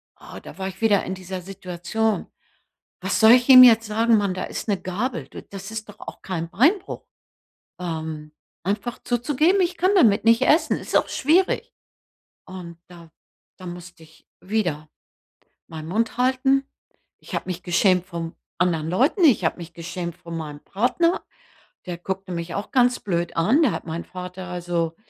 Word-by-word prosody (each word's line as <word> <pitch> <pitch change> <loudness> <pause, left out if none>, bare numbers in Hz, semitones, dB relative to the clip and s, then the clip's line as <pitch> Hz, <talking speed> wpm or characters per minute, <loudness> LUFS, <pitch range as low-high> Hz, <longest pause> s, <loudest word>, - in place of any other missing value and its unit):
ah, - - -11
da - - -12
war 190 -1 -3
ich 190 +2 -9
wieder 205 -3 +3
in 190 - -3
dieser 185 0 -7
Situation. 195 +3 -3 0.7
Was - - -1
soll 220 +1 +8
ich 245 0 +4
ihm 255 -1 +11
jetzt 225 -3 +6
sagen, 225 +2 +3
Mann? 200 -2 0
Da 185 - -4
ist - - -6
'ne 200 -3 0
Gabel. 230 +8 -3
Du - - -9
das 195 +1 -9
ist 220 -1 -6
doch 205 - -13
auch - - -10
kein 170 -3 -4
Beinbruch. 325 - +1 0.8
Ähm, 160 -3 -5 0.3
einfach 205 +5 -2
zuzugeben 295 - +2
„ich 350 0 -1
kann 370 +3 +2
damit 225 - +4
nicht 230 0 +4
essen“. 315 - +3
Ist - - -2
auch - - +2
schwierig. 340 +7 +1 0.7
Und 180 -3 -9
da 170 -2 -14 0.5
da 185 - -10
musste 175 -1 -10
ich 160 0 -23
wieder 175 -7 -2 0.8
meinen 155 -1 -8
Mund 225 +6 -1
halten. 265 +2 +2 0.6
Ich - - -10
habe - - -3
mich 180 -1 -5
geschämt 180 0 +2
vom 170 -2 -6 0.2
anderen 165 -3 0
Leuten, 265 - +2
ich 235 - +5
habe 160 - 0
mich 170 0 -9
geschämt 170 0 -6
vor 170 - -11
meinem 155 -3 -6
Partner, 250 - 0 0.6
der 175 -1 -5
guckte 190 +1 -5
mich 170 0 -5
auch 200 - -5
ganz 245 -1 +3
blöd 175 -3 -2
an, 225 - +3
da 260 - +3
hat - - -5
meinen 165 +1 -5
Vater 180 0 -8
also, 175 -2 -2
190 Hz, 170 wpm, -23 LUFS, 175-230 Hz, 0.8 s, ihm